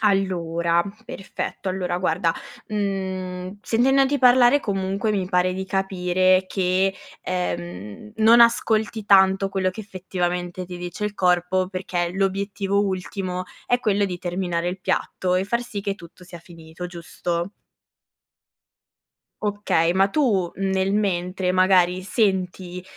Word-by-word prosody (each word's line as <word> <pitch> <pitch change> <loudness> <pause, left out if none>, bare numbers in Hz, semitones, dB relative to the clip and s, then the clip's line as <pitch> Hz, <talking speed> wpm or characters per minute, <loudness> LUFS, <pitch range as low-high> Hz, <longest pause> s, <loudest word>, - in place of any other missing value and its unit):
Allora, 170 -4 +1 0.2
perfetto. 195 -1 -5
Allora 180 -1 -2
guarda, 170 -1 +1 0.4
mhmm, 190 -2 -3
sentendoti 270 +4 +3
parlare, 250 +2 +6
comunque, 195 -1 -1
mi 190 -3 -1
pare 180 -1 +2
di 190 0 -3
capire 185 -1 +2
che, 190 0 +1 0.3
ehm, 100 - -4
non 230 +2 +6
ascolti 220 -2 +3
tanto 190 0 +5
quello 190 -1 0
che 220 - -8
effettivamente 180 -2 -3
ti 180 0 -7
dice 175 +4 -5
il 210 0 -3
corpo, 180 0 +1
perché 185 -2 -2
l'obiettivo 200 +1 0
ultimo 185 -1 -3 0.2
è 245 - +2
quello 205 -1 +2
di 180 -2 -4
terminare 175 -1 -2
il 185 +1 -5
piatto 180 0 -1
e 185 - 0
far 235 +4 -1
sì 215 -4 -6
che 200 -1 -2
tutto 180 -1 -15
sia 175 -1 -11
finito, 165 0 -10
giusto? 175 +1 -4 1.9
Okay, 205 -5 +1
ma 195 +2 +3
tu, 200 - +1
mh, 195 - -4
nel 190 +1 +1
mentre 185 -2 0
magari 185 -1 +3
senti, 185 -3 -1
185 Hz, 130 wpm, -23 LUFS, 180-200 Hz, 1.9 s, parlare